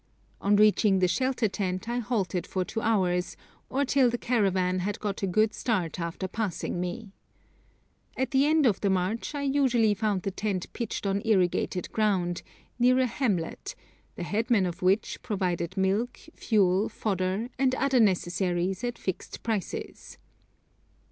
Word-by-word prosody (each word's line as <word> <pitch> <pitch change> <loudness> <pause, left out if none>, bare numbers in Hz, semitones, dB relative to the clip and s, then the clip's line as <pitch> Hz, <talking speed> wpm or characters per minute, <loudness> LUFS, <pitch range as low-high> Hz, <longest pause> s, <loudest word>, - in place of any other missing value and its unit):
On 205 +1 +3
reaching 210 -1 +4
the 185 -1 +3
shelter 255 +6 +1
tent 190 0 -3
I 240 +1 -1
halted 195 -7 -1
for 185 -1 -2
two 225 - -4
hours, 185 -5 +1 0.3
or 280 +2 0
till 265 -2 +4
the 240 - -1
caravan 190 -7 +1
had 200 +3 -2
got 205 -2 -3
a 195 - 0
good 215 +4 +2
start 185 -8 -1
after 170 +2 -3
passing 190 -3 -3
me. 185 +4 -5 1.1
At 260 - -1
the 270 +1 +4
end 310 -1 +3
of 220 -6 +2
the 200 - +2
march 190 +9 -1
I 285 - -2
usually 260 -6 +3
found 205 -2 -1
the 195 - -2
tent 195 -2 -3
pitched 230 -3 -4
on 195 0 0
irrigated 185 -4 +1
ground, 190 -5 0 0.4
near 250 +1 +5
a 260 - +3
hamlet, 215 -9 -2 0.4
the - - -5
headman 215 +1 +1
of 175 -1 -5
which 190 +4 +1
provided 185 -3 -2
milk, 200 +6 0
fuel, 200 -2 +2
fodder, 195 +2 -2
and 260 -1 +3
other 270 -1 +2
necessaries 185 -1 +1
at 240 -1 -2
fixed 190 - -5
prices. 220 -6 -4
205 Hz, 155 wpm, -27 LUFS, 185-235 Hz, 1.1 s, near